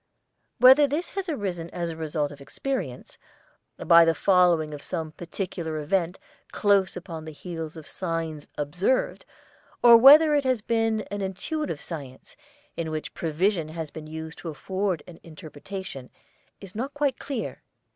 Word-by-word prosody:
Whether 265 +4 +8
this 305 +6 -3
has 390 -2 -4
arisen 185 - -3
as 170 -1 -3
the 165 - -5
result 155 -2 -2
of 145 -1 -12
experience, 175 - -5 0.6
by 170 0 +6
the 165 0 +3
following 175 -4 +3
of 145 - -7
some 160 -3 -4
particular 170 -2 -5
event 170 +4 -1 0.3
close 195 -2 +2
upon 165 -3 -7
the 160 - -8
heels 165 0 -7
of 155 - -10
signs 165 -4 -4
observed, 175 - 0 0.6
or 235 -1 +10
whether 300 +5 +8
it 290 -1 +3
has 255 -5 0
been 225 -1 +1
an 205 0 -3
intuitive 195 - -3
science, 140 -6 -8 0.4
in 165 -1 -3
which 155 -1 -5
provision 165 +1 0
has 160 -1 -6
been 155 -1 -9
used 160 +1 -7
to 170 - -6
afford 185 +2 -2
an 175 -2 -13
interpretation, 155 -2 -9 0.5
is 195 -1 -11
not 260 +6 -4
quite 290 -3 0
clear. 270 -5 -5
175 Hz, 150 wpm, -26 LUFS, 160-215 Hz, 0.6 s, or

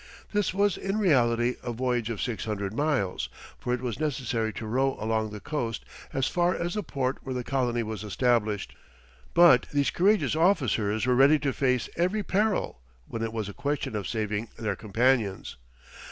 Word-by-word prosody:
This 205 -2 +1
was 200 0 +1
in 195 +2 -2
reality 125 - +2
a 120 - -4
voyage 120 -1 -1
of 115 -4 -3
six 120 -3 -3
hundred 100 -2 -3
miles, 105 - 0 0.3
for 125 - -3
it 125 0 0
was 125 -1 -3
necessary 125 -7 -1
to 115 - -6
row 130 +4 0
along 110 0 0
the 105 0 -7
coast 120 -5 -3 0.3
as 135 - 0
far 175 +3 +1
as 175 +1 -2
the 210 - -1
port 135 -7 -2
where 130 -1 -5
the 125 - -2
colony 120 -3 0
was 110 -1 -5
established. 105 0 0 0.6
But 170 -8 +7
these 145 -1 +1
courageous 200 -2 +2
officers 120 - +2
were 125 - +3
ready 135 +4 +6
to 140 -3 -1
face 125 -3 +1
every 185 +5 +1
peril, 200 - 0 0.3
when 115 - -5
it 115 -1 -2
was 110 -3 -3
a 100 - -7
question 140 -5 -2
of 100 -3 -3
saving 110 0 -2
their 105 -3 -2
companions. 110 -1 0
125 Hz, 180 wpm, -27 LUFS, 110-150 Hz, 0.6 s, But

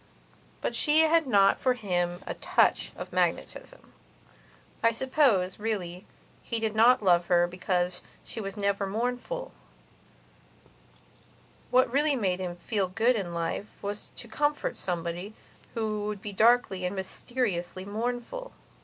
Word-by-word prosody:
But - - -2
she 305 +1 +4
had 320 -1 +4
not 200 -4 +4
for 255 -1 +2
him 175 -5 -1
a - - -3
touch - - +2
of - - -8
magnetism. - - -2 0.9
I 230 - +5
suppose, 230 -7 +2
really, 190 -5 -3 0.3
he 230 - -2
did 220 -1 -1
not 230 +1 +5
love 175 -2 +4
her 175 -1 +4
because 180 0 -1 0.2
she 225 - -6
was 195 +1 -6
never 200 -1 0
mournful; 250 - -3 2.2
what 250 -1 +4
really 290 +1 +3
made 190 -7 0
him 180 -2 -4
feel 195 +2 -1
good 225 +7 +2
in 190 -5 -3
life 170 +4 -2 0.2
was 205 +1 -5
to 235 - -5
comfort 290 +6 -1
somebody 175 +3 -4 0.4
who 215 -2 -1
would 210 -1 -3
be 205 - -5
darkly 220 -3 +3
and 180 +2 -2
mysteriously 190 -2 -3
mournful. 245 - -4
210 Hz, 135 wpm, -28 LUFS, 185-245 Hz, 2.2 s, I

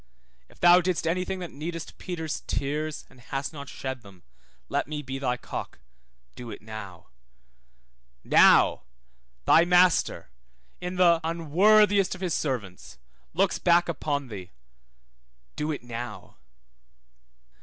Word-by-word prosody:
If - - -21
thou 175 +1 +7
didst 175 -3 -1
any 175 +3 0
thing 190 - -4
that 175 - -6
needest 165 +3 -7
Peter's 160 -4 -4
tears, 150 +2 -3
and 125 - -20
hast 135 +4 -4
not 140 -2 -8
shed 130 -1 -6
them, 100 -4 -17 0.4
let - - -1
me 150 0 -5
be 135 0 -5
thy 125 -2 -1
cock, - - -7 0.6
do 120 -1 -8
it - - -9
now. 105 -6 -9 1.1
Now, - - +5 0.6
thy 165 - +6
Master 175 - +3 0.5
(in 180 +1 -5
the 170 -2 +4
unworthiest 195 +5 +3
of 185 - -13
his 180 -4 -1
servants) 110 - -4 0.4
looks 190 +1 +1
back 175 0 +4
upon 145 -5 -2
thee, 95 -4 -8 1.1
do 150 +1 -2
it 145 - -5
now. 115 -5 -8
155 Hz, 130 wpm, -26 LUFS, 125-175 Hz, 1.1 s, thou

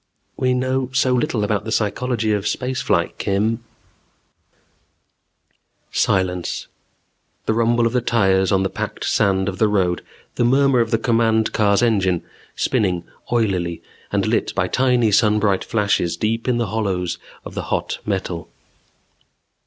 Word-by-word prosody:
"We 130 0 +1
know 130 0 0
so 130 0 +2
little 125 -3 0
about 105 -1 0
the 110 - -5
psychology 110 +1 0
of 105 0 -1
space 130 +2 -2
flight, - - 0
Kim 110 +4 0 1.5
" - - -6
Silence. 90 -2 -1 0.8
The - - +1
rumble 115 +1 +2
of 115 - 0
the 125 - +2
tires 95 -5 +2
on 95 -1 +3
the 95 - 0
packed - - -4
sand 95 -2 +2
of 95 -1 -4
the 110 - +4
road, 95 -4 0 0.3
the - - +2
murmur 135 +1 +4
of 115 -1 +1
the 115 - +2
command 115 -1 +1
car's 100 +1 +3
engine, 95 -7 +2 0.3
spinning 95 -9 0 0.3
oilily, 95 -8 0 0.3
and - - +1
lit - - 0
by 90 - +1
tiny 125 -1 +2
sunbright 105 -2 +3
flashes 100 -6 0
deep 115 +5 -1
in 125 -2 +2
the 120 - 0
hollows 95 -5 -1 0.3
of - - -8
the - - -4
hot - - -2
metal. 95 -4 -3
110 Hz, 145 wpm, -21 LUFS, 95-120 Hz, 1.5 s, the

